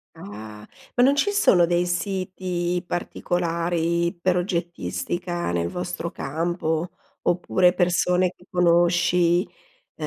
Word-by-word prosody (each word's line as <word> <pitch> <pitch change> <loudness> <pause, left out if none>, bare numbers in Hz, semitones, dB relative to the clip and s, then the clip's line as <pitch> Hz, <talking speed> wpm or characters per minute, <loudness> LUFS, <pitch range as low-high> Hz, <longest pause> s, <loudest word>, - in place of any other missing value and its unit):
Ah. 105 +1 -10 0.3
Ma 245 - +4
non 275 +2 +5
ci 405 +8 +1
sono 180 - +4
dei 175 0 +1
siti 180 -1 -2
particolari 170 0 -1
per 180 0 +1
oggettistica 175 - -3
nel 85 -1 0
vostro 180 -1 -4
campo, 160 +2 -2 0.3
oppure 180 0 +2
persone 180 0 +2
che 180 - -21
conosci, 175 0 +3 0.5
e - - -5
175 Hz, 105 wpm, -24 LUFS, 170-180 Hz, 0.5 s, non